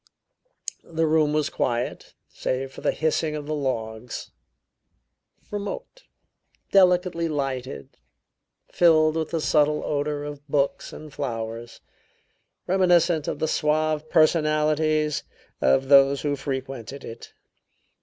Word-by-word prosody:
The 165 Hz, -1 st, -1 dB
room 155 Hz, -1 st, +3 dB
was 150 Hz, -1 st, 0 dB
quiet, 120 Hz, 0 st, -2 dB
save 130 Hz, +1 st, -3 dB
for -, -, -11 dB
the -, -, +2 dB
hissing 155 Hz, 0 st, 0 dB
of 150 Hz, -1 st, -5 dB
the 155 Hz, -, -3 dB
logs; 115 Hz, -5 st, -4 dB, 1.2 s
remote, 210 Hz, -, -6 dB, 0.7 s
delicately 180 Hz, -3 st, +4 dB
lighted, 135 Hz, -, -4 dB, 0.7 s
filled 155 Hz, -2 st, +4 dB
with 160 Hz, -1 st, -1 dB
the 165 Hz, -, -1 dB
subtle 150 Hz, -1 st, +2 dB
odor 145 Hz, 0 st, -2 dB
of 145 Hz, -1 st, -8 dB
books 140 Hz, -1 st, 0 dB
and 155 Hz, -2 st, -10 dB
flowers; 115 Hz, -3 st, -5 dB, 0.8 s
reminiscent 175 Hz, -4 st, +3 dB
of -, -, -2 dB
the 160 Hz, -, -1 dB
suave 155 Hz, 0 st, 0 dB
personalities 155 Hz, -1 st, +2 dB, 0.4 s
of 100 Hz, -, +3 dB
those 140 Hz, 0 st, +6 dB
who 145 Hz, -1 st, 0 dB
frequented 135 Hz, -1 st, -5 dB
it. 115 Hz, -, -10 dB
150 Hz, 110 wpm, -24 LUFS, 135-160 Hz, 1.2 s, those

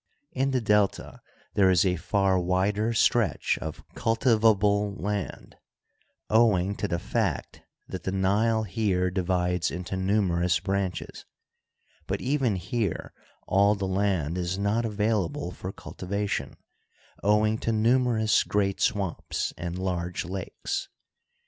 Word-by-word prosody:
In 135 Hz, +1 st, 0 dB
the 130 Hz, -2 st, 0 dB
Delta 105 Hz, -2 st, +1 dB, 0.3 s
there 95 Hz, -2 st, +4 dB
is 90 Hz, -2 st, +4 dB
a 90 Hz, -1 st, +2 dB
far 95 Hz, +2 st, +1 dB
wider 95 Hz, +5 st, +1 dB
stretch 115 Hz, -, +2 dB
of 80 Hz, -1 st, -6 dB
cultivable 105 Hz, -3 st, +2 dB
land, 105 Hz, 0 st, -4 dB, 0.7 s
owing 105 Hz, -4 st, +3 dB
to 105 Hz, -, -1 dB
the 85 Hz, -, -1 dB
fact -, -, -2 dB, 0.3 s
that -, -, -6 dB
the 95 Hz, -, -3 dB
Nile 105 Hz, +4 st, +2 dB
here 95 Hz, -3 st, 0 dB
divides 90 Hz, -1 st, 0 dB
into 90 Hz, +2 st, -5 dB
numerous 90 Hz, -3 st, +1 dB
branches; 95 Hz, 0 st, -3 dB, 0.8 s
but -, -, -1 dB
even 130 Hz, -5 st, +1 dB
here 100 Hz, +1 st, -3 dB, 0.3 s
all 100 Hz, +2 st, +4 dB
the 100 Hz, -1 st, -3 dB
land 95 Hz, -4 st, 0 dB
is 90 Hz, +1 st, -2 dB
not 105 Hz, +4 st, 0 dB
available 105 Hz, -5 st, -1 dB
for 90 Hz, +1 st, -6 dB
cultivation, 100 Hz, +2 st, -4 dB, 0.6 s
owing 105 Hz, +2 st, +2 dB
to 115 Hz, -, -1 dB
numerous 115 Hz, 0 st, +3 dB
great 100 Hz, -1 st, 0 dB
swamps 100 Hz, -6 st, -1 dB
and 85 Hz, 0 st, -5 dB
large 90 Hz, -2 st, -2 dB
lakes. 95 Hz, +1 st, -4 dB
100 Hz, 120 wpm, -27 LUFS, 90-110 Hz, 0.8 s, there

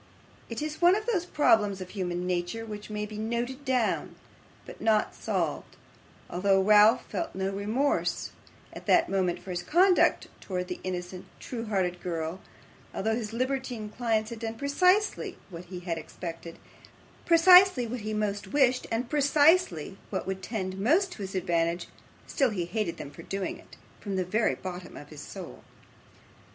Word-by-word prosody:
It 230 Hz, +5 st, -4 dB
is 310 Hz, +1 st, -5 dB
one 350 Hz, +2 st, +6 dB
of 425 Hz, +1 st, -3 dB
those 380 Hz, -7 st, 0 dB
problems 220 Hz, -, +3 dB
of 185 Hz, -1 st, -8 dB
human 180 Hz, -3 st, -3 dB
nature, 180 Hz, +5 st, -2 dB
which 210 Hz, -1 st, -8 dB
may 210 Hz, 0 st, -3 dB
be 210 Hz, 0 st, -8 dB
noted 240 Hz, +5 st, -3 dB
down, 255 Hz, -4 st, 0 dB, 0.5 s
but -, -, -11 dB
not 215 Hz, -1 st, +2 dB
solved; -, -, -3 dB, 0.5 s
although 195 Hz, +2 st, +2 dB
Ralph 210 Hz, +2 st, +6 dB
felt 195 Hz, -, -4 dB
no 190 Hz, +1 st, -1 dB
remorse 215 Hz, +9 st, -1 dB, 0.4 s
at -, -, -10 dB
that 335 Hz, -, +4 dB
moment 185 Hz, -3 st, +1 dB
for 190 Hz, -, -9 dB
his 175 Hz, -1 st, -2 dB
conduct 360 Hz, -, +3 dB
towards 180 Hz, -2 st, -4 dB
the -, -, -4 dB
innocent, 180 Hz, 0 st, -5 dB
true 230 Hz, -2 st, -6 dB
hearted 180 Hz, -4 st, -1 dB
girl; 170 Hz, +1 st, -3 dB, 0.5 s
although 220 Hz, +3 st, 0 dB
his 225 Hz, -2 st, -3 dB
libertine 255 Hz, -2 st, -2 dB
clients 220 Hz, -1 st, -1 dB
had 230 Hz, -, -6 dB
done 225 Hz, 0 st, -4 dB
precisely 365 Hz, -, +1 dB
what 170 Hz, 0 st, -8 dB
he 180 Hz, 0 st, -8 dB
had 170 Hz, -2 st, -3 dB
expected, 165 Hz, +1 st, -8 dB, 0.7 s
precisely 360 Hz, -4 st, +7 dB
what 240 Hz, +2 st, -4 dB
he 215 Hz, 0 st, -4 dB
most 210 Hz, -1 st, -2 dB
wished, 260 Hz, -3 st, +2 dB
and 230 Hz, +2 st, -1 dB
precisely 290 Hz, -, +3 dB
what 190 Hz, -, -3 dB
would 190 Hz, 0 st, -4 dB
tend 190 Hz, -4 st, -4 dB
most 340 Hz, -, +3 dB
to -, -, -9 dB
his 195 Hz, 0 st, -5 dB
advantage, 170 Hz, -1 st, 0 dB, 0.4 s
still 270 Hz, -3 st, +1 dB
he 185 Hz, -6 st, -2 dB
hated 190 Hz, 0 st, -2 dB
them 140 Hz, -, -8 dB
for -, -, -11 dB
doing 195 Hz, -1 st, -4 dB
it, -, -, -16 dB, 0.2 s
from 200 Hz, -2 st, -4 dB
the 185 Hz, -1 st, 0 dB
very 215 Hz, +5 st, +1 dB
bottom 180 Hz, -1 st, -8 dB
of 145 Hz, -, -11 dB
his 150 Hz, -2 st, -10 dB
soul. -, -, -9 dB
210 Hz, 165 wpm, -28 LUFS, 185-255 Hz, 0.7 s, precisely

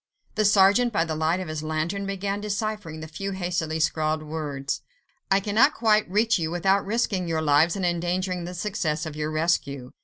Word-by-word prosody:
The 215 Hz, -, +1 dB
sergeant, 205 Hz, +4 st, +5 dB
by 170 Hz, -6 st, +1 dB
the 160 Hz, -, -3 dB
light 160 Hz, +3 st, 0 dB
of 185 Hz, -, -5 dB
his 155 Hz, -1 st, -4 dB
lantern, 160 Hz, +6 st, -2 dB
began 195 Hz, +1 st, -2 dB
deciphering 210 Hz, -6 st, -3 dB
the 160 Hz, -, -6 dB
few 195 Hz, +5 st, -5 dB
hastily 175 Hz, -4 st, -2 dB
scrawled 155 Hz, 0 st, 0 dB
words. 150 Hz, -3 st, -4 dB, 0.5 s
"I 195 Hz, -, +4 dB
cannot 220 Hz, +9 st, +3 dB
quite 215 Hz, -3 st, +2 dB
reach 215 Hz, +2 st, +2 dB
you, 160 Hz, -1 st, -1 dB
without 190 Hz, +4 st, +2 dB
risking 200 Hz, -4 st, -1 dB
your 160 Hz, -1 st, -1 dB
lives 155 Hz, +4 st, +4 dB
and 190 Hz, -2 st, -1 dB
endangering 175 Hz, +1 st, -1 dB
the 180 Hz, +1 st, -6 dB
success 165 Hz, -5 st, -2 dB
of 155 Hz, -1 st, -6 dB
your 150 Hz, 0 st, -2 dB
rescue. 155 Hz, -5 st, -1 dB
175 Hz, 185 wpm, -25 LUFS, 155-200 Hz, 0.5 s, sergeant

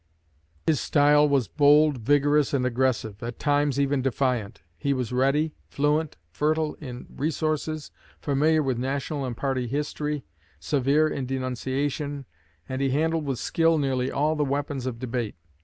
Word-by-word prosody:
His 155 Hz, -3 st, +2 dB
style 150 Hz, 0 st, +4 dB
was 135 Hz, -6 st, +2 dB
bold, 145 Hz, -, +4 dB
vigorous, 145 Hz, +4 st, +3 dB
and 125 Hz, -2 st, +1 dB
aggressive; 120 Hz, -4 st, 0 dB
at 120 Hz, 0 st, -5 dB
times 145 Hz, -2 st, +1 dB
even 140 Hz, -1 st, +1 dB
defiant. 125 Hz, -6 st, -1 dB
He 140 Hz, +12 st, 0 dB
was 125 Hz, -2 st, -3 dB
ready, 140 Hz, +5 st, +2 dB
fluent, 150 Hz, +2 st, 0 dB
fertile 155 Hz, -, 0 dB
in 125 Hz, -4 st, -7 dB
resources, 155 Hz, +1 st, -2 dB, 0.3 s
familiar 155 Hz, +2 st, +2 dB
with 130 Hz, -3 st, -1 dB
national 140 Hz, +2 st, -2 dB
and 120 Hz, -2 st, -5 dB
party 130 Hz, -3 st, -1 dB
history, 150 Hz, +1 st, -2 dB, 0.4 s
severe 140 Hz, -, +2 dB
in 135 Hz, -4 st, -3 dB
denunciation, 135 Hz, +2 st, -2 dB, 0.4 s
and 130 Hz, +1 st, -3 dB
he 135 Hz, -, +2 dB
handled 160 Hz, +3 st, 0 dB
with 135 Hz, -3 st, -2 dB
skill 165 Hz, +4 st, +2 dB
nearly 130 Hz, -3 st, 0 dB
all 150 Hz, +3 st, +1 dB
the 150 Hz, -, +1 dB
weapons 140 Hz, -2 st, -2 dB
of 120 Hz, -3 st, -3 dB
debate. 120 Hz, -3 st, -3 dB
140 Hz, 145 wpm, -26 LUFS, 130-150 Hz, 0.4 s, style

